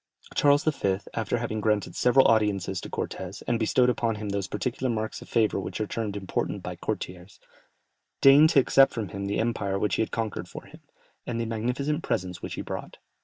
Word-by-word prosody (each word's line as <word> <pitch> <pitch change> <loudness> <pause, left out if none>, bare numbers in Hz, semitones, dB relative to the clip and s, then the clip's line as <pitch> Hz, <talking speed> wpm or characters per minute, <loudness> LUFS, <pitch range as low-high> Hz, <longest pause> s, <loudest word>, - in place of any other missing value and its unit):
Charles 145 0 +4
V., 100 -11 +1 0.2
after 115 +1 -1
having 110 -2 -3
granted 105 -1 0
several 130 +2 +5
audiences 100 -4 +1
to - - -8
Cortès, 95 +1 -5
and 120 -1 +1
bestowed 125 +2 +3
upon 115 -2 +1
him 105 -1 -5
those 100 -1 -2
particular 125 +5 -2
marks 110 -1 -3
of - - -12
favour 110 -3 +2
which 95 - -5
are 110 - 0
termed 105 -1 -3
important 95 -3 -3
by - - -5
courtiers, 90 +2 -6 0.8
deigned 140 +3 +7
to 150 - +5
accept 135 +1 +5
from 110 -5 -3
him 100 0 -5
the 100 - -1
empire 100 -4 -1
which 100 -3 0
he - - +1
had 110 - 0
conquered 110 -6 -3
for - - -8
him, - - -15 0.5
and 115 -1 -2
the 115 - -1
magnificent 125 +7 -1
presents 90 - -3
which - - -5
he - - -4
brought. - - -6
110 Hz, 200 wpm, -27 LUFS, 100-120 Hz, 0.8 s, deigned